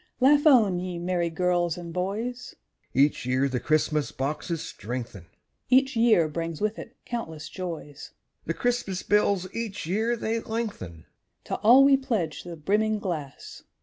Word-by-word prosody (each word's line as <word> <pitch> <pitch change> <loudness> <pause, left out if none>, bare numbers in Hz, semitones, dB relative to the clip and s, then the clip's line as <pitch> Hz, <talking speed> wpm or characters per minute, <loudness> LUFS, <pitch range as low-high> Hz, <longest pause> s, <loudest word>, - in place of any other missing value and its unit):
_) - - -34 0.2
Laugh 290 +4 +5
on, 215 -11 +5
ye 180 -1 -4
merry 175 0 -1
girls 175 0 0
and 170 -1 -8
boys! 220 +7 -3 0.4
(Each 140 +3 +2
year 130 +2 +1
the 130 -2 -2
Christmas 155 0 +1
boxes 155 +4 -3
strengthen,) 115 -5 -7 0.4
Each 265 +1 +4
year 225 -8 +4
brings 165 +1 -4
with 215 +1 -1
it 235 - -10
countless 160 -11 -5
joys; 165 -6 -7 0.4
(The 165 - -1
Christmas 240 -7 -1
bills 200 -3 +2
each 225 -6 -4
year 220 +7 0
they 230 0 -2
lengthen.) 210 - -5 0.4
To - - -3
all 245 +5 +7
we 275 0 +6
pledge 215 - -2
the 175 -1 -8
brimming 215 +7 +1
glass! 165 -9 -6
180 Hz, 150 wpm, -26 LUFS, 155-230 Hz, 0.4 s, all